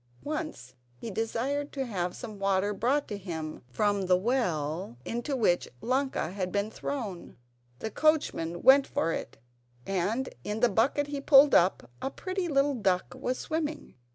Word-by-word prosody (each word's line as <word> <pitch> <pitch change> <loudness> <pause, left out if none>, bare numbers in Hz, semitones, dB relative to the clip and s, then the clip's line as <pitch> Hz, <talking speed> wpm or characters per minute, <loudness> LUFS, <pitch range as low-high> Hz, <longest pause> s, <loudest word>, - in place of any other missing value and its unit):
Once 305 - -5 0.2
he 220 - -7
desired 250 +7 -2
to 270 -1 -3
have 180 -6 -2
some 215 -4 -8
water 195 +1 +1
brought 265 +8 +1
him 170 -6 -5
from 200 +7 +1
the 180 0 +5
well 175 - -1
into 240 +5 -2
which 195 -8 +2
Ilonka 260 - -1
had 185 -2 -3
been 205 +2 -1
thrown. 220 - -5 0.4
The 220 - -5
coachman 175 - +1
went 270 +1 +7
for 165 - 0
it - - -5 0.5
and, 200 +7 0 0.2
in 210 +2 -3
the 245 - +5
bucket 255 +7 +2
he 285 -1 -4
pulled 280 0 +7
up, 175 -7 +4
a - - -1
pretty 370 +4 -3
little 285 -2 +2
duck 190 -6 0
was 255 -1 -2
swimming. 315 -1 -3
225 Hz, 155 wpm, -29 LUFS, 185-275 Hz, 0.5 s, went